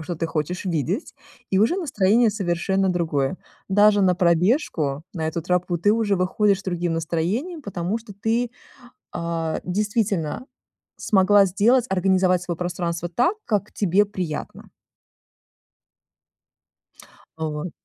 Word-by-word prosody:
что 165 Hz, +1 st, -5 dB
ты 165 Hz, -, -2 dB
хочешь 165 Hz, +4 st, -3 dB
видеть, 180 Hz, -, -2 dB, 0.4 s
и 190 Hz, -, +2 dB
уже 225 Hz, -, +3 dB
настроение 235 Hz, -, +2 dB
совершенно 190 Hz, -1 st, 0 dB
другое. 165 Hz, -4 st, 0 dB, 0.3 s
Даже 205 Hz, +1 st, +5 dB
на 180 Hz, -1 st, +4 dB
пробежку, 170 Hz, -, +1 dB
на 160 Hz, -2 st, -2 dB
эту 165 Hz, 0 st, -3 dB
тропу, 180 Hz, 0 st, 0 dB
ты 205 Hz, +5 st, +3 dB
уже 215 Hz, -3 st, +1 dB
выходишь 195 Hz, +2 st, +1 dB
с -, -, -19 dB
другим 175 Hz, -2 st, -1 dB
настроением, 180 Hz, -, -2 dB
потому 190 Hz, 0 st, -3 dB
что 220 Hz, -2 st, -12 dB
ты, 225 Hz, +4 st, -1 dB, 0.6 s
а, 165 Hz, -1 st, -2 dB
действительно 205 Hz, -, -1 dB, 0.5 s
смогла 200 Hz, 0 st, +4 dB
сделать, 225 Hz, +7 st, +3 dB
организовать 185 Hz, -1 st, +2 dB
свое 175 Hz, -2 st, -4 dB
пространство 175 Hz, -1 st, -3 dB
так, 245 Hz, -, +1 dB
как 210 Hz, -2 st, -1 dB
тебе 200 Hz, +1 st, +2 dB
приятно. 180 Hz, -7 st, -6 dB, 2.7 s
Вот. 155 Hz, +1 st, -4 dB
185 Hz, 120 wpm, -23 LUFS, 170-210 Hz, 2.7 s, Даже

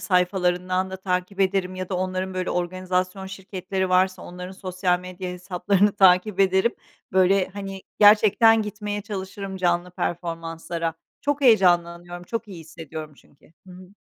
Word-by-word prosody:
sayfalarından 180 Hz, 0 st, +1 dB
da 190 Hz, -, -5 dB
takip 185 Hz, +1 st, -3 dB
ederim 190 Hz, -1 st, +1 dB
ya 185 Hz, -1 st, -5 dB
da 190 Hz, -, -3 dB
onların, 185 Hz, 0 st, -2 dB
böyle, 185 Hz, 0 st, -2 dB
organizasyon 185 Hz, +1 st, -2 dB
şirketleri 190 Hz, 0 st, -4 dB
varsa 185 Hz, 0 st, +2 dB
onların 180 Hz, +1 st, -8 dB
sosyal 185 Hz, -1 st, -1 dB
medya 180 Hz, 0 st, -6 dB
hesaplarını 185 Hz, +3 st, +1 dB
takip 190 Hz, +1 st, +4 dB
ederim. 190 Hz, +4 st, +3 dB, 0.4 s
Böyle, 190 Hz, 0 st, +3 dB
hani, 195 Hz, -1 st, -7 dB, 0.2 s
gerçekten 215 Hz, +2 st, +6 dB
gitmeye 210 Hz, -1 st, -4 dB
çalışırım 195 Hz, -1 st, -6 dB
canlı 175 Hz, -1 st, 0 dB
performanslara. 165 Hz, -1 st, -4 dB, 0.3 s
Çok 290 Hz, 0 st, -1 dB
heyecanlanıyorum, 175 Hz, -6 st, +3 dB
çok 230 Hz, +3 st, -4 dB
iyi 185 Hz, -4 st, -9 dB
hissediyorum 160 Hz, -1 st, -9 dB
çünkü. 145 Hz, +3 st, -24 dB
Hı 185 Hz, -, -12 dB
hı. 185 Hz, +1 st, -12 dB
185 Hz, 135 wpm, -24 LUFS, 180-195 Hz, 0.4 s, gerçekten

